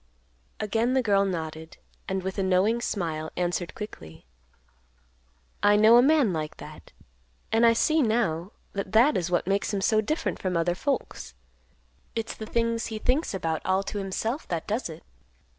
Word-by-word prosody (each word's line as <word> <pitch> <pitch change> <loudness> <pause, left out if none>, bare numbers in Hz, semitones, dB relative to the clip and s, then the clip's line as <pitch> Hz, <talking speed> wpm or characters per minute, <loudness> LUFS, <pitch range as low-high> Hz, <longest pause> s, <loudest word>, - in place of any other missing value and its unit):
Again 225 +4 0
the 260 - +2
girl 200 -3 +3
nodded, 160 -3 -5 0.3
and, 190 -1 -2
with 190 +1 -4
a - - +2
knowing 190 +5 +2
smile, 160 -8 -3
answered 175 -2 -2
quickly, 80 - -9 1.4
"I 205 0 +5
know 220 +3 +7
a - - +8
man 275 - +4
like 155 -1 -4
that. - - -12 0.6
And 230 +1 +5
I 230 - +6
see 310 +7 +2
now 215 - 0 0.2
that 200 0 -4
that 245 +7 +5
is 175 -1 -1
what 175 -1 +1
makes 195 +3 0
him 200 - -1
so 215 +2 +3
different 305 +10 -2
from 185 -2 -1
other 170 +1 +1
folks. 185 - -3 0.8
It's 225 -1 -3
the 220 - -8
things 230 0 0
he 220 - -5
thinks 255 +2 0
about 160 -4 -2
all 190 +1 +1
to 205 - -4
himself 220 +8 -3
that 165 -2 -3
does 215 -1 -2
it. 160 +1 -10
200 Hz, 170 wpm, -26 LUFS, 175-230 Hz, 1.4 s, a